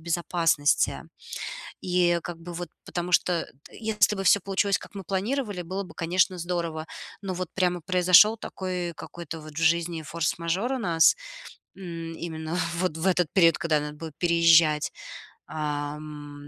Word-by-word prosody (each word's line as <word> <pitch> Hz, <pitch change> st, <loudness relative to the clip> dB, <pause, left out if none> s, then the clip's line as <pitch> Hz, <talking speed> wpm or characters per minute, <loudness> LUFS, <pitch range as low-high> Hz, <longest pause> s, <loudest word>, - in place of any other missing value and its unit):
безопасности. 165 Hz, -3 st, +1 dB, 0.8 s
И 180 Hz, -1 st, +2 dB
как 175 Hz, -1 st, -6 dB
бы 175 Hz, +1 st, -8 dB
вот, 175 Hz, +1 st, -5 dB, 0.2 s
потому 175 Hz, 0 st, -4 dB
что 175 Hz, -1 st, +2 dB, 0.2 s
т -, -, -14 dB
если 210 Hz, -2 st, +2 dB
бы 195 Hz, -, -3 dB
всё 200 Hz, +2 st, +5 dB
получилось, 195 Hz, +1 st, +1 dB
как -, -, -13 dB
мы 195 Hz, -, -6 dB
планировали, 205 Hz, +2 st, -2 dB
было 190 Hz, +4 st, -4 dB
бы, 185 Hz, -, -12 dB
конечно, 180 Hz, +2 st, +1 dB
здорово. 170 Hz, -2 st, -3 dB, 0.3 s
Но 195 Hz, -2 st, -3 dB
вот 180 Hz, -1 st, -4 dB
прямо 180 Hz, -2 st, 0 dB
произошел 185 Hz, +5 st, +6 dB
такой 180 Hz, -4 st, -4 dB
какой-то 165 Hz, -1 st, -8 dB
вот 155 Hz, 0 st, -10 dB
в -, -, -13 dB
жизни 165 Hz, 0 st, +2 dB
форс-мажор 170 Hz, -, -1 dB
у -, -, -1 dB
нас, 170 Hz, -6 st, +4 dB, 0.6 s
м, 165 Hz, -3 st, -6 dB
именно 160 Hz, 0 st, -5 dB, 0.2 s
вот 180 Hz, -2 st, -1 dB
в 160 Hz, -, -4 dB
этот 180 Hz, -4 st, +2 dB
период, 170 Hz, -4 st, +5 dB
когда 165 Hz, -5 st, +1 dB
надо 150 Hz, 0 st, -5 dB
будет 160 Hz, -1 st, -8 dB
переезжать. 165 Hz, -3 st, +4 dB, 0.6 s
Ам, 145 Hz, -1 st, -5 dB
170 Hz, 155 wpm, -26 LUFS, 160-185 Hz, 0.8 s, произошел